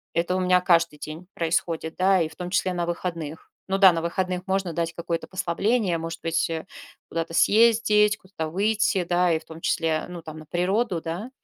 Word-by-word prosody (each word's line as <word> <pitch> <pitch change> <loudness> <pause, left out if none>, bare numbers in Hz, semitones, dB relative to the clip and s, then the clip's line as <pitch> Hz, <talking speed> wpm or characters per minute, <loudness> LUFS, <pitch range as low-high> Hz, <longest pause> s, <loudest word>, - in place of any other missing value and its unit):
Это 170 +2 +1
у - - 0
меня 180 0 +4
каждый 170 -3 +2
день 155 +4 -8
происходит, 165 -1 -1
да, 190 +1 +3
и 165 -2 0
в 160 - -16
том 180 +2 -5
числе 185 0 +1
на 175 -1 -2
выходных. 170 -3 -5 0.2
Ну 195 0 0
да, 190 -2 +7
на 165 - -1
выходных 180 +2 -2
можно 190 -2 -1
дать 170 0 -2
какое-то 170 -1 -3
послабление, 185 +1 0
может 165 0 -5
быть, 165 0 0
э, 160 -1 -4 0.4
куда-то 165 0 -3
съездить, 210 0 +4
куда-то 185 -4 -6
выйти, 205 +1 +1
да, 175 0 +2
и 160 - +3
в 160 - -21
том 160 0 -11
числе, 160 -2 0
ну 175 -2 -8
там, 155 -1 -9
на 155 - -11
природу, 185 +3 0
да. 170 +9 -5
175 Hz, 200 wpm, -25 LUFS, 165-190 Hz, 0.4 s, да